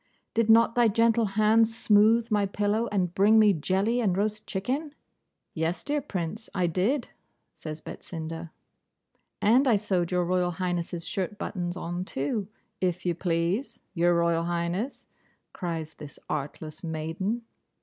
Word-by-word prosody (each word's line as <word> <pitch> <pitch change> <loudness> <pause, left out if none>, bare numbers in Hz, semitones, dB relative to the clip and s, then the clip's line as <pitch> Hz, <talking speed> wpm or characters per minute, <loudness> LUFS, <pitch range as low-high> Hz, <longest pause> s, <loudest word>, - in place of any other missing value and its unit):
'Did 230 -1 +1
not 230 +1 +6
thy 240 -1 +4
gentle 230 +1 +3
hand 220 +1 +5
smooth 225 +1 +3
my 205 -1 +2
pillow, 210 +3 0
and 180 -4 0
bring 205 +4 +5
me 210 -2 +6
jelly 190 +8 0
and 190 -5 +1
roast 215 +1 -1
chicken?' 270 +10 -3 0.6
'Yes, 165 +2 -2
dear 295 0 -1
Prince, 200 - -5
I 180 -2 +2
did,' 200 - 0 0.4
says 155 0 -7
Betsinda, 165 0 -7 0.9
'and 245 +6 +5
I 235 - +5
sewed 190 -4 0
Your 180 -1 +1
Royal 180 0 +1
Highness's 175 -1 -3
shirt 195 +1 -3
buttons 180 -3 -3
on 175 0 -3
too, 185 - -2 0.3
if 180 -1 -1
you 175 - +2
please, 170 - -1
Your 175 -1 +3
Royal 170 0 +2
Highness,' 175 +8 -2 0.5
cries 165 -3 -4
this 145 -1 -10
artless 150 +1 -5
maiden. 165 +8 -3
190 Hz, 140 wpm, -27 LUFS, 170-220 Hz, 0.9 s, not